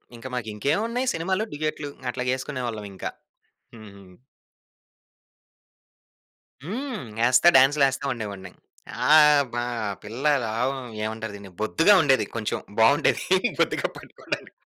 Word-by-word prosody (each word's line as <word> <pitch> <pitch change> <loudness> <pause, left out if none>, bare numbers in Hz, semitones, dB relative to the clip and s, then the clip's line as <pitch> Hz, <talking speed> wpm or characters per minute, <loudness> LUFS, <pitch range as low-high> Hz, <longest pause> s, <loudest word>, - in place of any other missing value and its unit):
ఇంక 120 +2 -9
మాకింకేవున్నాయి 150 - -1
సినిమాలు, 190 +5 -1
డ్యూయెట్లు 155 0 -3 0.2
అట్లాగేసుకునేవాళ్ళవింక. 125 -6 -4 0.7
హ్మ్. 100 -3 -14 2.6
హ్మ్. 225 - -5
యేస్తా 125 +7 +6
డాన్స్‌లేస్తా 135 0 +3
ఉండేవాడిని. 100 -5 -7 0.6
ఆహ్, 150 -1 +7
బా 120 0 -1 0.4
పిల్ల 115 +6 -7 0.2
లావ్ 115 +5 -1 0.3
ఏవంటారు 110 0 -4
దిన్ని? 100 -2 -11
బొద్దుగా 165 - +4
ఉండేది 135 -4 +3
కొంచెం. 110 -2 -2 0.2
బావుండేది 140 +8 +4 0.4
బొద్దుగా - - +1
పట్టుకోవడానికి. - - -7
130 Hz, 90 wpm, -24 LUFS, 110-150 Hz, 2.6 s, ఆహ్